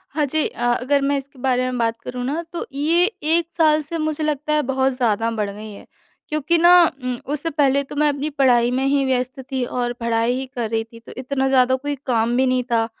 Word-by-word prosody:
हाँ 300 - +2
जी, 310 +2 0
अ 240 0 -1
अगर 280 +2 +1
मैं 280 +1 +1
इसके 275 0 -9
बारे 255 -1 +1
में 250 - -3
बात 230 -1 -1
करूँ 250 0 -5
ना 295 +6 -2
तो 340 - -4
ये 320 +5 +2 0.2
1 325 +2 +2
साल 310 -2 +4
से 320 +3 -5
मुझे 310 -1 -2
लगता 300 0 -1
है 300 - +3
बहुत 265 0 +1
ज़्यादा 230 -3 0
बढ़ 210 -3 -2
गई 210 +1 -9
है। 200 - -12 0.4
क्योंकि 305 +3 +1
ना 345 +1 +6 0.3
उम, 250 -1 -2
उससे 300 +3 -3
पहले 280 -2 +2
तो 280 - -10
मैं 300 +1 +2
अपनी 285 +1 -2
पढ़ाई 250 -4 +3
में 260 +1 0
ही 275 0 +2
व्यस्त 255 0 -1
थी 260 -1 -1
और 245 0 -2
पढ़ाई 230 +1 +1
ही 265 - -4
कर 235 -3 -2
रही 225 0 -1
थी 230 - -11
तो 230 - -14
इतना 265 +1 -1
ज़्यादा 260 -1 +3
कोई 290 +2 -4
काम 235 -2 +1
भी 265 - +3
नहीं 255 0 +1
था 225 -1 +2
265 Hz, 235 wpm, -21 LUFS, 245-295 Hz, 0.4 s, ना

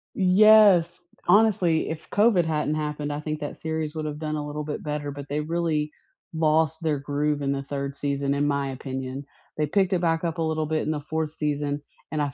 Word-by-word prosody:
Yes. 190 -3 +6 0.3
Honestly, 190 -7 +3
if 160 0 -6
COVID 205 -5 +3
hadn't 155 -1 0
happened, 150 -1 -3
I 145 - -3
think 155 0 -4
that 145 - -5
series 160 -1 -3
would 155 -1 -3
have 150 -1 -4
done 155 -1 -3
a 150 -1 -3
little 150 +1 -4
bit 145 0 -5
better, 150 -1 -3
but 140 0 -8
they 150 +1 -1
really 155 -2 -1 0.4
lost 160 0 +2
their 155 -3 0
groove 145 +1 -1
in 140 0 0
the 140 0 -1
3rd 140 0 -4
season, 140 -1 -1
in 145 +1 +1
my 140 -1 0
opinion. 130 +1 -5 0.3
They 150 -1 +1
picked 190 +3 +2
it 180 - +1
back 165 0 +1
up 165 0 -2
a - - +1
little 155 -1 0
bit 155 +1 -1
in 155 - -1
the 150 -1 -2
4th 155 0 -3
season, 145 -1 -2 0.3
and 155 -1 -1
af 140 -3 -1
150 Hz, 215 wpm, -25 LUFS, 145-160 Hz, 0.4 s, Yes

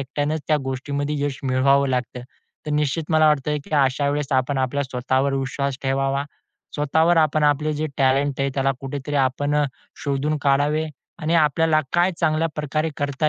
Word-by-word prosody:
एकट्यानेच 145 +3 -2
त्या 155 - +4
गोष्टीमध्ये 140 +2 -3
यश 140 -2 -3
मिळवावं 135 +2 +3
लागतं. 125 -1 -2 0.4
तर - - -3
निश्चित 150 +2 0
मला 155 0 +5
वाटतं 150 0 +1
की - - -16
अशावेळेस 140 +1 +1
आपण 130 +1 +1
आपल्या, 130 +2 0
स्वतःवर 130 +2 0
विश्वास 135 0 -2
ठेवावा. 135 +1 0 0.5
स्वतःवर 160 +4 +2
आपण 155 -1 +3
आपले 150 +1 +2
जे 155 +1 -2
टॅलेंट 135 +1 +2
आहे, 135 - +1
त्याला 135 0 +1
कुठेतरी 140 +1 -5
आपण 140 +2 +1
अ, 150 - +3 0.4
शोधून 145 +2 0
काढावे 145 +3 +2 0.4
आणि 160 +2 +1
आपल्याला 155 0 +3
काय 175 +2 +3
चांगल्याप्रकारे 155 -1 0
करता 145 +1 0
145 Hz, 155 wpm, -22 LUFS, 135-150 Hz, 0.5 s, मला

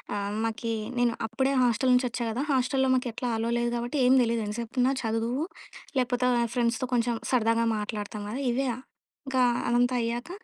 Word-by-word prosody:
ఆహ్, 200 0 -2
మాకీ 225 0 -2 0.2
నేను 240 -1 +2
అప్పుడే 265 +5 0
హాస్టల్ 250 +2 +2
నుంచి 250 0 +3
వచ్చా 235 +1 -3
గదా! 245 +5 -2
హాస్టల్‌లో 265 0 +2
మాకెట్లా 250 -1 -2
అలో 230 +1 -1
లేదు 240 0 0
గాబట్టి 240 +4 -2
ఏం 255 +1 +6
తెలీదు. 230 -1 0
ఎంతసేపున్నా 240 +4 0
చదువు 230 +6 -1 0.5
లేపోత 250 0 0 0.3
ఫ్రెండ్స్‌తో 235 0 0
కొంచెం 235 0 +1 0.2
సరదాగా 230 -2 +2
మాట్లాడతాం 210 0 -4
గదా! 250 +6 -4
ఇవే 265 +3 0 0.6
ఇంక 265 -1 -2 0.3
అదంతా 245 +1 +2
అయ్యాక 235 +5 -3
240 Hz, 155 wpm, -27 LUFS, 230-255 Hz, 0.6 s, ఏం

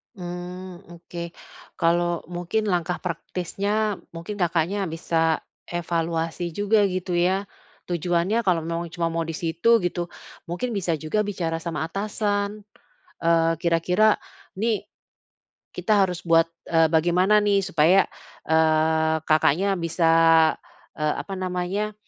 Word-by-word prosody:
Mmm, 180 0 -8
oke 170 0 -8 0.5
kalau 170 0 +2
mungkin 180 +5 -2
langkah 180 -2 0
praktisnya 200 +5 -2 0.2
mungkin 170 +5 -6
Kakaknya 180 +1 0
bisa 165 -1 0 0.2
evaluasi 170 0 -2
juga 205 +4 +2
gitu 185 -2 -1
ya, 190 +3 +1 0.4
tujuannya 175 +6 0
kalau 180 -5 +2
memang 165 +1 -4
cuma 170 -1 -1
mau 165 0 -1
di 165 - -4
situ 170 +9 +2
gitu 175 -2 -3 0.4
mungkin 230 +7 -2
bisa 170 -5 -1
juga 160 +8 0
bicara 165 -5 -3
sama 165 -2 -3
atasan, 205 +2 -2 0.6
eee, 165 0 +3
kira-kira 175 +6 +2 0.4
nih 220 -1 0 0.9
kita 210 -2 +2
harus 180 0 -7
buat, 165 0 +4 0.2
eee, 165 -1 +3
bagaimana 175 +5 +4
nih 205 -1 +2
supaya, 180 +1 +4 0.4
eee, 160 0 +2
Kakaknya 165 +5 +2
bisa, 165 0 +1 0.9
eee, 150 0 +1
apa 195 - -7
namanya, 185 +3 -2
175 Hz, 115 wpm, -24 LUFS, 165-195 Hz, 0.9 s, buat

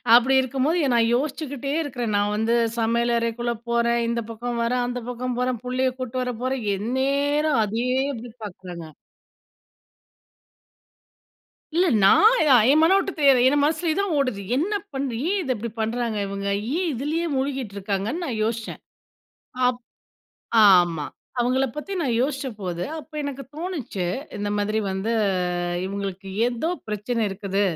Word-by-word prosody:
அப்டி 245 +2 +5
இருக்கும்போது 275 +6 0
நான் 230 0 +3
யோசிச்சுக்கிட்டே 280 0 -3
இருக்கிறேன். 245 -7 -3
நான் 205 0 +1
வந்து 225 +2 +1 0.3
சமையல் 235 +1 +1
அறைக்குள்ளே 235 +1 -1 0.2
போறேன், 235 0 +2
இந்த 235 0 0
பக்கம் 240 +1 -4
வர்றேன், 245 +1 +1
அந்த 245 0 -3
பக்கம் 250 0 -3
போறேன், 250 -2 0
புள்ளைய் 255 0 0
கூட்டிட்டு 255 0 -3
வர 250 - -2
போறேன், 260 -2 -1
எந்நேரம் 280 +6 +1
அதே 230 +4 -2 0.3
அப்டி 235 0 -8
பார்க்குறாங்க. 180 -3 -8 2.9
இல்ல 360 +2 +4 0.2
நான் 435 - +7 0.4
என் 305 - +5
மனோட்ட 390 +3 +4
தெரியாது 275 -4 +5
என் 290 +1 +2
மனசுலேயே 315 +2 +1
தான் 400 -4 -1
ஓடுது 255 -8 0 0.2
என்ன 380 +9 0 0.2
பண்ண? 270 0 -2 0.2
ஏன் 405 - +1
இத 265 - -5
இப்படி 230 +2 -5
பண்றாங்க 225 -1 -1
இவங்க? 200 0 -4 0.3
ஏன் 360 -1 0
இதுலேயே 300 +7 -1
முழுகிட்டு 265 -6 -2
இருக்காங்கன்னு 200 - -2
நான் 225 -5 -3
யோசிச்சேன். 225 0 -3 0.9
அப் 250 -1 -3 0.9
ஆமா 175 -5 +4 0.3
அவங்கள 255 +2 +2
பத்தி 350 +7 -5
நான் 260 -7 0
யோசிச்சபோது 215 - -3
அப்போ 310 0 -10
எனக்கு 280 -1 -5
தோணுச்சு. 300 - -4 0.3
இந்த 205 0 -2
மாதிரி 210 +1 0
வந்து 195 +4 -2 0.7
இவங்களுக்கு 195 -1 -5 0.2
ஏதோ 245 +6 -1 0.2
பிரச்சன 215 +2 -1
இருக்குது. 195 +1 -2
245 Hz, 135 wpm, -24 LUFS, 220-280 Hz, 2.9 s, நான்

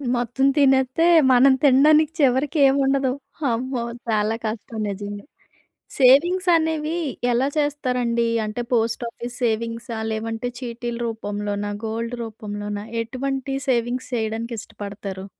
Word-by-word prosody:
మొత్తం 245 +3 0
తినేత్తే 265 +2 +3 0.3
మనం 260 +2 +6
తినడానికి 300 +3 +5
చివరికి 275 +2 +2
ఏం 270 - +3
ఉండదు. 270 -1 +1 0.4
అమ్మో! 245 +1 -2 0.3
చాలా 215 0 +1
కష్టం 220 +1 -5
నిజంగా. 205 +1 -6 0.7
సేవింగ్స్ 335 +8 +5
అనేవి 320 0 0 0.4
ఎలా 245 +3 +2
చేస్తారండి? 250 -5 0 0.2
అంటే 215 +3 -4
పోస్ట్ 230 +1 +1
ఆఫీస్ 240 +1 -8
సేవింగ్సా? 230 +1 -2
లేదంటే 225 +2 -3
చీటీల 240 -1 -5
రూపంలోనా? 205 -2 -3
గోల్డ్ 230 +2 -3
రూపంలోన? 205 -2 -6 0.2
ఎటువంటి 270 +3 -3
సేవింగ్స్ 245 0 0
చేయడానికి 225 +1 -3
ఇష్టపడతారు? 200 -2 -7
240 Hz, 110 wpm, -22 LUFS, 220-270 Hz, 0.7 s, మనం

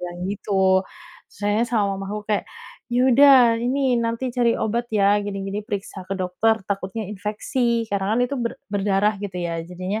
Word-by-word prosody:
bilang 175 0 -6
gitu. 190 -2 +2 0.5
Terus - - -21
akhirnya 205 +3 +2
sama 225 -3 +1 0.2
mamaku 200 +2 -4
kayak, 205 - +1 0.4
"Ya 240 0 +1
udah, 275 +2 +8 0.2
ini 255 0 +1
nanti 230 +2 -2
cari 240 -2 +2
obat 235 +2 -1
ya, 205 0 +4
gini, 200 -1 -4
gini, 195 +2 -3
periksa 195 -2 -6
ke 195 - -2
dokter, 195 +4 0
takutnya 195 +2 -3
infeksi," 230 +3 -1
karena 200 +2 0
kan - - +2
itu 265 - -3
ber 235 -1 -1 0.2
berdarah, 205 +1 +1
gitu 200 -3 -6
ya. 170 -2 -2
Jadinya, 185 +4 -4
205 Hz, 175 wpm, -22 LUFS, 195-235 Hz, 0.5 s, udah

